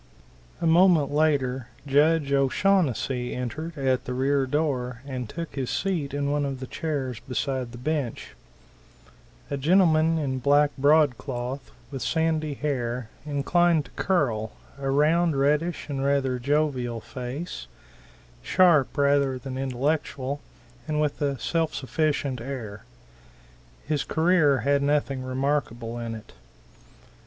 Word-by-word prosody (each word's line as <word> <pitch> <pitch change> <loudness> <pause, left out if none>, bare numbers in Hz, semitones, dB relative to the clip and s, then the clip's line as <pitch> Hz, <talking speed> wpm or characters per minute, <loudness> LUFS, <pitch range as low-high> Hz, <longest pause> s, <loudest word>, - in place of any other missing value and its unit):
A - - 0
moment 165 -3 +5
later 135 -5 +1 0.2
Judge 145 +1 +3
O'Shaunnessy 135 - +1
entered 155 +7 -5
at 130 -2 0
the 125 - -3
rear 135 +1 +1
door 130 -4 -1
and 130 -5 -5
took 165 -3 -6
his 135 -3 -3
seat 175 -8 -1
in 140 0 -1
one 145 0 +1
of 135 -2 -3
the 130 - -5
chairs 135 -5 -3
behind 125 0 -3
the 120 - -9
bench; 140 -2 -3 1.2
a 140 - -1
gentleman 165 +1 +4
in 135 -4 -1
black 145 +3 +4
broadcloth, 135 -3 +1 0.2
with 135 -2 -5
sandy 160 -2 0
hair, 125 -5 -2 0.2
inclined 155 +2 +2
to - - -16
curl, 120 - 0 0.3
a 135 -1 -2
round, 155 +2 +3
reddish 150 +5 +1
and 135 -2 -3
rather 135 -2 +1
jovial 130 -3 0
face, 125 - -6 0.7
sharp 170 -7 +3
rather 140 -2 +3
than 130 0 -7
intellectual, 135 +1 -2 0.5
and 150 -1 -1
with 150 -1 -1
a 140 -2 0
self 165 +5 -1
sufficient 140 -2 -1
air. 115 -6 -6 1.0
His 150 -1 0
career 160 -4 +3
had 140 0 +2
nothing 140 -2 0
remarkable 130 -3 -2
in 115 -1 -4
it. 110 - -12
140 Hz, 125 wpm, -26 LUFS, 130-155 Hz, 1.2 s, moment